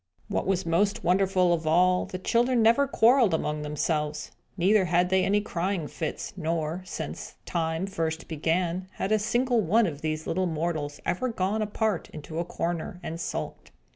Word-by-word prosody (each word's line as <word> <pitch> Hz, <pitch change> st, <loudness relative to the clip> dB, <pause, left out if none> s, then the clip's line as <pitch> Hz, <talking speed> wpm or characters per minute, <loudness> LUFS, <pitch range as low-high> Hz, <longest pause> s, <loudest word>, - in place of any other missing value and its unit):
What -, -, -1 dB
was 190 Hz, -1 st, +1 dB
most 195 Hz, +5 st, +1 dB
wonderful 185 Hz, 0 st, +3 dB
of 160 Hz, -2 st, -2 dB
all, 180 Hz, +3 st, +3 dB
the 185 Hz, -, -5 dB
children 235 Hz, +5 st, +2 dB
never 235 Hz, +6 st, +5 dB
quarrelled 235 Hz, -6 st, +4 dB
among 150 Hz, -1 st, -2 dB
themselves; 150 Hz, 0 st, -2 dB, 0.3 s
neither 190 Hz, +2 st, +4 dB
had 175 Hz, +1 st, +2 dB
they 190 Hz, 0 st, +4 dB
any 205 Hz, +2 st, +2 dB
crying 180 Hz, -4 st, -2 dB
fits; 155 Hz, +1 st, -5 dB
nor, 160 Hz, +1 st, -2 dB
since -, -, -6 dB
time 165 Hz, +1 st, -1 dB
first 165 Hz, -4 st, -3 dB
began, 170 Hz, +3 st, -1 dB
had 195 Hz, -, -3 dB
a 215 Hz, -, +4 dB
single 240 Hz, +2 st, +1 dB
one 215 Hz, +5 st, +3 dB
of 150 Hz, -5 st, -4 dB
these 155 Hz, 0 st, -2 dB
little 185 Hz, +2 st, 0 dB
mortals 155 Hz, -3 st, -2 dB
ever 255 Hz, +8 st, 0 dB
gone 210 Hz, 0 st, -1 dB
apart 210 Hz, -2 st, -1 dB
into 155 Hz, +1 st, -7 dB
a 170 Hz, -, -1 dB
corner, 175 Hz, 0 st, -3 dB
and 165 Hz, +1 st, -5 dB
sulked. -, -, -5 dB
180 Hz, 170 wpm, -27 LUFS, 160-205 Hz, 0.3 s, never